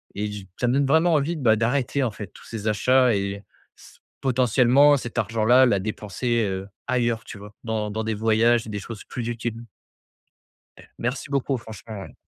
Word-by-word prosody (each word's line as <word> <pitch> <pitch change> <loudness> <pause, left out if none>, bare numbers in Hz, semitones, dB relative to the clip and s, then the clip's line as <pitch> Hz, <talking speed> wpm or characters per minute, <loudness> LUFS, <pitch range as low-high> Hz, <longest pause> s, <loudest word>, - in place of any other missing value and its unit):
et 105 +1 -2
du 105 -2 -8
ça 125 - +1
me 125 - +2
donne 140 0 +2
vraiment 160 +5 +3
envie 155 +3 +1
de, 155 - -6
bah, 110 -2 +5
d'arrêter, 125 +4 0
en 125 - +1
fait, 105 -1 -8
tous - - -15
ces 110 -2 -6
achats 125 +4 +3
et 100 0 -3 0.3
s - - -17 0.2
potentiellement 130 +2 +4
cet 120 -2 -7
argent-là, 115 +4 +4
la 105 -6 +2
dépenser, 110 +3 -2
heu, 95 0 -4 0.2
ailleurs, 120 -2 0
tu 105 - -9
vois? 105 +1 -12
Dans 110 -2 -2
dans 110 +2 -3
des 110 - -1
voyages 115 +2 +2
et - - -9
des 105 -1 -4
choses 110 +1 -8
plus 120 -2 -6
utiles. 115 -1 -4 1.2
Eh - - -16
merci 125 +4 -3
beaucoup, 140 -1 0
franchement, 110 -3 -9
ouais. - - -11
115 Hz, 195 wpm, -24 LUFS, 105-125 Hz, 1.2 s, bah